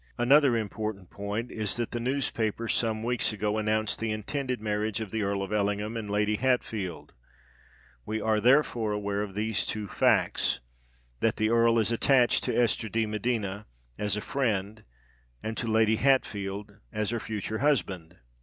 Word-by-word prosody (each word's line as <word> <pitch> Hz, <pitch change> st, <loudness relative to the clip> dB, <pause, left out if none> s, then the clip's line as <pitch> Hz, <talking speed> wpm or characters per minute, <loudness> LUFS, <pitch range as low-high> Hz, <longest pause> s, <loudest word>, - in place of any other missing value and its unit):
Another 130 Hz, 0 st, +5 dB
important 105 Hz, -3 st, -4 dB
point 105 Hz, +4 st, -4 dB
is 105 Hz, -3 st, -2 dB
that 120 Hz, -1 st, -3 dB
the 120 Hz, -, -2 dB
newspapers 115 Hz, -3 st, 0 dB
some 110 Hz, -1 st, 0 dB
weeks 120 Hz, 0 st, +1 dB
ago 105 Hz, 0 st, -1 dB
announced 110 Hz, 0 st, 0 dB
the 115 Hz, -1 st, -1 dB
intended 125 Hz, +4 st, -3 dB
marriage 105 Hz, 0 st, -1 dB
of 110 Hz, -4 st, -5 dB
the 110 Hz, -, -1 dB
Earl 100 Hz, -1 st, -1 dB
of 95 Hz, -, -5 dB
Ellingham 105 Hz, +1 st, 0 dB
and 110 Hz, -3 st, -4 dB
Lady 105 Hz, +1 st, +1 dB
Hatfield. 110 Hz, -8 st, -1 dB, 0.9 s
We 110 Hz, -, -3 dB
are 110 Hz, 0 st, +1 dB
therefore 120 Hz, -3 st, +3 dB
aware 100 Hz, -1 st, -1 dB
of 100 Hz, -2 st, -5 dB
these 110 Hz, 0 st, 0 dB
two 105 Hz, -2 st, -3 dB
facts—that -, -, 0 dB
the 110 Hz, +1 st, +1 dB
Earl 115 Hz, 0 st, +4 dB
is 115 Hz, 0 st, +2 dB
attached 125 Hz, +1 st, +3 dB
to -, -, 0 dB
Esther 115 Hz, -2 st, +1 dB
de 115 Hz, +2 st, +1 dB
Medina 105 Hz, -2 st, -2 dB, 0.3 s
as 105 Hz, 0 st, 0 dB
a -, -, -2 dB
friend, 110 Hz, -5 st, -1 dB, 0.6 s
and 110 Hz, +1 st, -3 dB
to 120 Hz, -, -2 dB
Lady 110 Hz, 0 st, +3 dB
Hatfield 105 Hz, -6 st, 0 dB
as 105 Hz, 0 st, -1 dB
her 120 Hz, -, -1 dB
future 110 Hz, 0 st, -4 dB
husband." 95 Hz, -, 0 dB
110 Hz, 160 wpm, -28 LUFS, 100-115 Hz, 0.9 s, Another